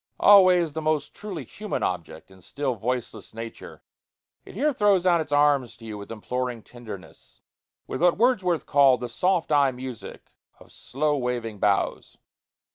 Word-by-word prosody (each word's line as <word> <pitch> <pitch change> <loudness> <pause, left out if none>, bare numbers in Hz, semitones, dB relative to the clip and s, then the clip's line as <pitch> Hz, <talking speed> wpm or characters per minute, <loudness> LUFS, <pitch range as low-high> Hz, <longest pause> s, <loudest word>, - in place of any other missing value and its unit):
Always 185 -5 +6
the 160 - -4
most 155 -1 -1
truly 195 -8 -7
human 210 - -5
object 85 0 -4
in 95 -1 -17
still, 140 +6 -3
voiceless 115 -2 -5
nature, 115 0 -9 0.6
it - - -13
here 290 +7 +1
throws 205 -6 +2
out 170 -2 +4
its 155 - -7
arms 145 -4 +2
to 115 - -13
you 110 -1 -6
with 100 +1 -9
imploring 120 +1 -4
tenderness, 110 -6 -12 0.4
with 130 - -5
what 175 -1 +4
Wordsworth 190 -8 +1
called 135 -4 +4
"the 125 - -4
soft 180 +6 0
eye 145 -2 +4
music 125 -2 -9 0.3
of - - -18
slow 150 +3 -2
waving 120 -5 -3
boughs." 100 -1 -1
135 Hz, 155 wpm, -25 LUFS, 115-175 Hz, 0.6 s, Always